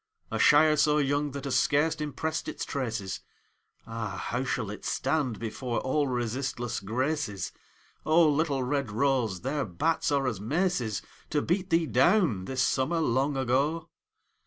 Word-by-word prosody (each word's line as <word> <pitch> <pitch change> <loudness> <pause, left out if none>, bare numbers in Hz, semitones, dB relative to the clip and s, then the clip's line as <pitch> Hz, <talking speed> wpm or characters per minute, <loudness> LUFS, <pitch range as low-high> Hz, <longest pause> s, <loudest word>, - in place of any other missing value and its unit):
A - - -2
Shire 155 +1 +6
so 150 +1 +4
young 145 0 +1
that 140 -1 -6
has 135 -2 +1
scarce 150 +3 +2
impressed 155 +2 -3
its - - -4
traces, 110 -8 -3 0.7
Ah, 110 -4 -5
how 125 +2 -1
shall 115 -6 -2
it 105 - -9
stand 135 -4 0
before 115 +2 -3
all 145 +2 +1
resistless 120 0 -2
Graces? 115 - -2 0.5
O, 160 +1 +5
little 145 -3 +1
red 140 0 -1
rose, 115 -4 0
their 140 +3 -1
bats 145 - 0
are 140 -1 +2
as 115 -7 -1
maces 130 - 0 0.3
To 150 -1 0
beat 180 +2 0
thee 165 -1 +3
down, 130 - +3
this 130 +2 0
summer 140 +6 +1
long 135 -1 +1
ago 140 +6 0
135 Hz, 150 wpm, -28 LUFS, 120-150 Hz, 0.7 s, Shire